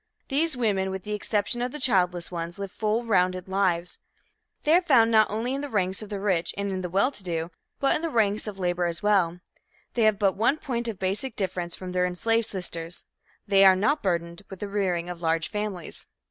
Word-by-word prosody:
These 300 +1 +1
women, 200 -5 +1
with 190 -1 -5
the 210 - -4
exception 210 +3 -1
of 245 +1 -1
the 300 - -7
childless 180 - +2
ones, 170 0 -5
live 200 -1 -5
full 220 +2 0
rounded 185 -4 +1
lives. 185 -3 0 0.6
They 305 - +3
are 355 - +6
found 245 -10 +4
not 220 -1 +5
only 225 +5 -2
in 275 - -2
the 290 - -5
ranks 190 -4 0
of 215 - -8
the 205 -2 -4
rich 190 -4 0
and 195 -2 -2
the 180 - -3
well 200 +9 +2
to 210 - -11
do, 165 -1 -3 0.3
but 275 - +3
in - - -1
the 330 - -1
ranks 215 -5 +1
of 205 -2 -5
labor 175 -1 0
as 170 +3 -2
well. 180 -4 +2 0.5
They 240 - 0
have 215 -2 +4
but 195 -2 +2
one 235 +8 +2
point 235 -5 -3
of 225 -4 -4
basic 200 +7 -2
difference 180 -3 -2
from 185 -1 -7
their 180 0 +1
enslaved 225 +5 0
sisters 170 -3 -5 0.4
they 195 -1 +5
are 190 -1 +8
not 220 +11 +1
burdened 170 -1 -2
with 190 - -9
the 205 - -4
rearing 185 -4 -1
of 175 -1 -6
large 165 -1 0
families. 210 -5 -5
195 Hz, 215 wpm, -26 LUFS, 180-225 Hz, 0.6 s, are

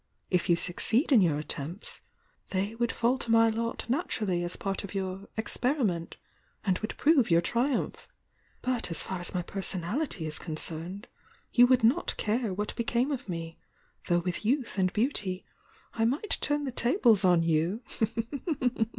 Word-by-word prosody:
If 180 0 +1
you 170 - +6
succeed 220 - 0
in 240 -6 +7
your 160 -5 +3
attempts 150 +5 -5 0.5
they 200 +3 -1
would 235 0 0
fall 245 +3 +1
to - - -4
my 225 0 +6
lot 230 +1 -2
naturally 215 - 0
as 175 - -2
part 195 +1 -3
of 200 0 -8
your 190 0 -3
'experiment,' 220 - 0 0.5
and 185 -2 +1
would 215 - -5
prove 290 -6 +4
your 170 0 +5
triumph. 245 +8 -1 0.6
But 245 -7 0
as 165 - 0
far 190 - -4
as 175 - -5
my 180 - 0
personality 195 - -2
is 155 0 -3
concerned, 170 +5 -3 0.5
you 245 0 +7
would 255 -1 +4
not 255 +10 +2
care 220 0 0
what 210 +3 -3
became 240 +4 0
of 265 -6 -4
me, 165 -1 -5 0.5
though 175 - +3
with 180 +2 -3
youth 240 -2 0
and 185 -1 +2
beauty 210 -5 -1 0.5
I 225 - +1
might 285 - +3
turn 290 0 +1
the 270 - -3
tables 235 - +4
on 175 -2 +5
you!" 165 +8 +1
210 Hz, 160 wpm, -29 LUFS, 175-245 Hz, 0.6 s, in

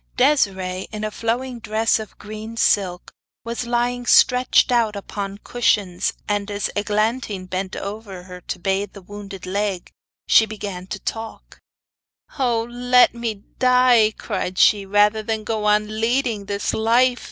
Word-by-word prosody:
Desiree, 190 -9 +1
in 215 -1 -5
a 215 - -2
flowing 240 +3 -2
dress 220 0 +1
of 215 -2 -9
green 215 +2 -8
silk, 185 -5 +1 0.3
was 235 +1 -4
lying 245 +1 -1
stretched 250 0 +5
out 230 -3 +2
upon 200 0 -5
cushions, 205 -7 0
and 205 0 -1
as 205 -1 -2
Eglantine 210 -1 -1
bent 185 +1 -4
over 200 -3 -7
her 180 0 -11
to 180 - -5
bathe 195 +2 -1
the 200 - -11
wounded 200 -1 -9
leg, 195 -1 -2 0.3
she 220 - +5
began 200 -4 -6
to 205 - -5
talk: 225 +3 -7 0.8
'Oh! 240 -3 +1
let 245 +1 +3
me 225 -4 -4 0.2
die,' 250 -4 +4
cried 185 0 -4
she, 200 -2 +4
'rather 205 +2 +3
than 220 0 -3
go 215 -1 -2
on 210 +1 +1
leading 235 -3 0
this 200 0 -2
life. 245 +3 +3
215 Hz, 145 wpm, -21 LUFS, 200-235 Hz, 0.8 s, stretched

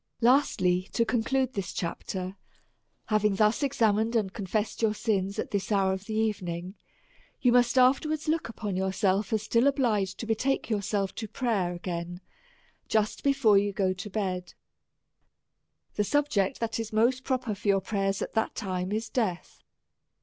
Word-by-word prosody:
Lastly, 190 -8 +3
to 230 - +2
conclude 260 +3 0
this 195 -6 -3
chapter: 185 +2 -4 0.7
Having 210 -2 +2
thus 210 +5 +2
ex 280 -2 -1
amined 220 +1 +2
and 200 -4 0
confessed 210 +2 -2
your 220 -1 +2
sins 200 -3 -1
at - - -3
this 200 +1 -2
hour 195 -2 +3
of 190 +1 -6
the 220 - -4
evening, 185 -5 -2 0.7
you 250 - +3
must 245 0 +4
iiftcrwards 290 +5 +3
look 315 -5 0
upon 210 -4 -4
yourself 190 +1 0
as 220 -1 0
still 230 +4 +3
obliged 215 -9 +1
to - - -5
betake 230 +3 0
yourself 200 -1 -1
to 220 - -5
prayer 205 -7 -1
again 175 0 -5 0.7
just 215 -1 0
before 270 -8 +4
you 205 0 0
go 190 -2 +1
to 185 +3 -7
bed. 185 -3 -3 1.4
The 210 - +1
subject 255 -6 +1
that 230 0 -1
is 225 -1 -4
most 240 +4 +2
pro 260 - +1
per 235 -4 -4
for 205 +1 -7
your 200 -1 +4
prayers, 195 0 -1
at - - -6
that 220 - 0
time, 185 -1 -3
is 220 +2 -2
death. 215 -7 -3
210 Hz, 165 wpm, -28 LUFS, 190-235 Hz, 1.4 s, must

